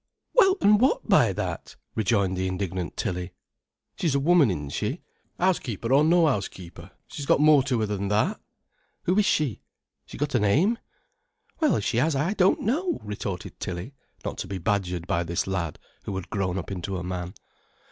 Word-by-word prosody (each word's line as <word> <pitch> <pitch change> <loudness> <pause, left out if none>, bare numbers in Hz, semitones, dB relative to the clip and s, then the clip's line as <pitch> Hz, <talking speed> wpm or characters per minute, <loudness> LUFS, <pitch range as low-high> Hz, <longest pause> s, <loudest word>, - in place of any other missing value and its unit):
"Well, 390 -6 +5
an' 210 0 +5
what 265 - +2
by - - +5
that?" - - -5 0.2
rejoined 100 -3 +1
the 95 0 -1
indignant 95 -1 -3
Tilly. 90 0 -3 0.7
"She's 160 -6 +1
a - - +3
woman, 160 -2 +5
isn't 75 -6 -3
she, - - -3 0.4
housekeeper 130 - 0
or 140 +2 +6
no 170 +1 +5
housekeeper? 95 - -3 0.2
She's 145 -2 -7
got - - +4
more 150 -1 +6
to 130 -3 0
her - - +2
than 100 -1 -2
that! 105 +2 +1 0.6
Who 180 - +1
is 210 - +3
she—she's 145 -9 -4
got 145 0 -1
a 120 - +3
name?" 160 - +2 0.8
"Well, 310 -4 +3
if 100 - -2
she 115 - 0
has, 150 +4 +2
I 150 +9 +1
don't 190 -2 +3
know," 320 - 0
retorted 100 -3 -5
Tilly, 90 +9 -5 0.3
not - - -4
to - - -4
be 100 - -4
badgered 90 -2 -1
by 85 - 0
this 85 0 -2
lad 90 -5 -2 0.3
who 100 - -4
had 95 -2 -6
grown 95 -3 -1
up 95 - -5
into 95 0 -4
a 90 - -5
man. 90 0 -5
105 Hz, 180 wpm, -26 LUFS, 90-155 Hz, 0.8 s, or